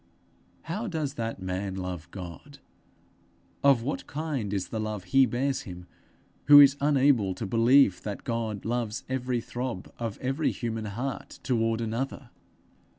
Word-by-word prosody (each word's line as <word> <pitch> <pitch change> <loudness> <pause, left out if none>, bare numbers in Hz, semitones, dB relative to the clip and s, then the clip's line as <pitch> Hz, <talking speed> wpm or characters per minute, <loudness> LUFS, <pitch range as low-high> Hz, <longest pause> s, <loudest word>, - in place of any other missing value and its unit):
How 210 +8 -4
does 155 -7 -2
that 115 -5 -4
man 95 +1 -3
love 90 -3 -5
God 95 - -9 1.1
of 135 -4 +5
what 140 - -3
kind 145 -9 -3
is 100 -3 -2
the 110 - -3
love 110 -3 -3
he 130 +8 +4
bears 130 +4 -1
him 90 -2 -9 0.6
who 145 0 +10
is 140 -1 +8
unable 135 -9 +3
to 110 - -4
believe 115 -1 +4
that 105 -2 -5
God 115 -4 -3
loves 115 -1 -2
every 125 -2 -1
throb 120 -5 -5
of 115 -3 -3
every 135 +4 0
human 115 -2 -3
heart 120 +6 -5
toward 115 -2 +1
another? 120 +3 -4
115 Hz, 145 wpm, -28 LUFS, 105-135 Hz, 1.1 s, who